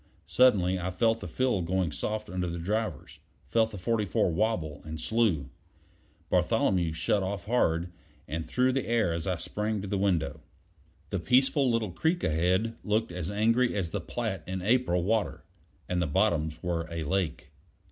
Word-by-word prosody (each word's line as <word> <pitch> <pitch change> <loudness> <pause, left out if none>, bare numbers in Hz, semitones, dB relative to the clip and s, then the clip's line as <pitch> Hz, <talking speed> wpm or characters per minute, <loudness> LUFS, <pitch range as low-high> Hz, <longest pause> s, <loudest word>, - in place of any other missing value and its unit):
Suddenly 95 -8 +4
I 90 +1 -2
felt 115 +4 +1
the - - -6
fill 125 -7 0
going 90 -1 0
soft 105 +6 -3
under 90 -1 -2
the 85 0 -4
drivers; 105 +2 -3 0.3
felt 115 -1 +2
the 105 - -8
44 100 -2 +1
wobble 85 -5 -1
and 80 +1 -6
slew. 80 - +1 0.8
Bartholomew 85 -4 +2
shut 80 +6 0
off 95 -1 -3
hard, 90 -7 +1 0.4
and 80 +3 -3
threw 125 +11 +1
the 135 0 -1
air 110 -7 +2
as 85 +1 -3
I 90 -2 0
sprang 105 +5 -2
to - - -4
the 100 0 -1
window. 80 -6 0 0.7
The 100 - 0
peaceful 130 - +3
little 115 -4 0
creek 160 - 0
ahead 90 +8 +1
looked 110 -1 0
as 90 0 -4
angry 115 +4 +2
as 90 -5 -2
the 100 - -2
Platte 105 -2 -3
in 95 0 -4
April 105 -6 +2
water, 100 -5 0 0.4
and 90 -1 0
the 85 - +1
bottoms 80 -2 +1
were 85 -1 -1
a 85 -1 -3
lake. 80 -2 -2
95 Hz, 165 wpm, -29 LUFS, 85-110 Hz, 0.8 s, Suddenly